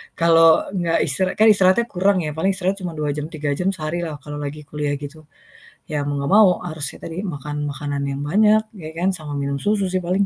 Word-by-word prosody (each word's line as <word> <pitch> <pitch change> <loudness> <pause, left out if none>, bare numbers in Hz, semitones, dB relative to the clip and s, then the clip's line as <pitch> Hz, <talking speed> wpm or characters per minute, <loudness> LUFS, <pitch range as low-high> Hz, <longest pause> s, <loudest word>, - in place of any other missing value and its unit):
kalau 165 -1 +5
nggak 175 -3 0
istirahat 185 +6 +1
kan 220 - +6
istirahatnya 190 +2 +4
kurang 190 +1 +2
ya, 150 - -3
paling 190 +5 +1
istirahat 190 +1 -1
cuma 175 -2 -4
2, 150 -1 -1
jam 150 +1 -4
3 150 -2 -3
jam 180 +4 0
sehari 160 +1 -3
lah 155 -2 -5
kalau 145 0 -7
lagi 145 +1 -6
kuliah 150 -1 -2
gitu, 150 +1 -10 0.6
ya 150 -2 -1
mau 145 0 -2
nggak 140 - -2
mau 210 -2 +7 0.2
harusnya 155 -4 -3
tadi 170 +4 -5
makan 145 -3 -4
makanan 145 0 -4
yang 140 0 -4
banyak 210 +7 +4 0.2
ya 155 -3 -8
kan, 180 +3 +1
sama 155 -4 -6
minum 140 0 -2
susu 205 0 0
sih 185 - 0
paling. 185 +3 +1
160 Hz, 215 wpm, -21 LUFS, 145-185 Hz, 0.6 s, mau